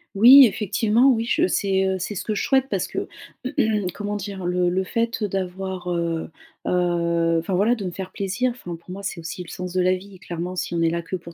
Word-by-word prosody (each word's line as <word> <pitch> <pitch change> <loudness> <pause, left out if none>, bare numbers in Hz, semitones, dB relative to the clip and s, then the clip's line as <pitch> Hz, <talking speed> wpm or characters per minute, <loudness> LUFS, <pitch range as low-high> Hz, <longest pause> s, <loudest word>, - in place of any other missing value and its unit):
Oui, 255 +6 +10
effectivement, 220 +4 +2
oui. 230 -3 +2
Je 325 +9 +2
c'est, 190 -1 +1
heu, 190 0 0
ce 185 +1 -4
que 215 - -1
je - - -1
souhaite 265 -1 +2
parce - - -1
que, - - -4 0.9
comment 205 0 -3
dire, 195 -2 -6
le 180 0 +1
le 190 +2 0
fait 230 +2 -1
d'avoir, 190 -1 -3
heu, 170 -2 -2 0.4
heu 170 -2 +1
enfin 175 +3 -4
voilà, 220 +6 +3
de 200 -4 -6
me 180 - -3
faire 190 +1 -7
plaisir 200 +6 -1
enfin 175 -8 -7
pour 170 +2 -18
moi, 200 +2 -7
c'est 175 -3 -4
aussi 165 +2 -6
le 175 - -9
sens 180 0 -6
de 185 0 +1
la 185 +1 +3
vie. 190 0 -11
Clairement, 175 +2 -5
si 175 - -3
on 165 - 0
est 165 - +3
là 170 +1 -2
que 175 +3 -5
pour 170 -1 -9
185 Hz, 230 wpm, -23 LUFS, 175-210 Hz, 0.9 s, Oui